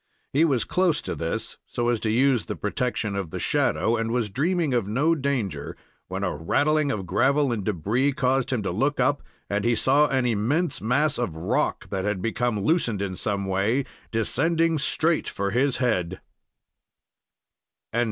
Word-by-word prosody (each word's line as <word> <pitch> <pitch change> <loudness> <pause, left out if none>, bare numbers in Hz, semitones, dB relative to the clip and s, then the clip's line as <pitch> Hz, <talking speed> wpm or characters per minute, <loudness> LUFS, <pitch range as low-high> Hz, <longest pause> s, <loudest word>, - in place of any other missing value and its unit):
He 145 +4 +4
was 135 -7 +1
close 180 -4 +1
to - - -3
this, 80 0 -4
so 120 0 -1
as 120 -2 +1
to 110 - -1
use 125 +1 +2
the - - -3
protection 105 -1 -2
of 95 -4 -3
the - - -5
shadow, 115 - +1
and 115 0 -1
was 115 -3 -1
dreaming 160 - 0
of 120 -5 +1
no 140 +10 +2
danger, 130 - -2 0.3
when 95 +2 -4
a 90 - -1
rattling 145 - +1
of 95 -5 -3
gravel 130 - +2
and 110 -4 -2
debris 105 - 0
caused 135 -2 0
him 120 -5 0
to 100 - -1
look 135 +10 0
up, 140 +3 +2 0.3
and 100 0 -1
he 120 0 +2
saw 140 +6 +4
an 130 -3 0
immense 125 - 0
mass 140 +5 +1
of 110 -10 -2
rock, 80 - -1
that 95 -1 -2
had 105 -1 -1
become 115 0 -1
loosened 120 - +1
in 100 -2 -3
some 100 0 -2
way, 100 +8 +1 0.2
descending 160 +8 +1
straight 160 +3 +1
for 100 0 -2
his 130 +4 +1
head. 95 -8 0
120 Hz, 170 wpm, -25 LUFS, 100-140 Hz, 0.3 s, He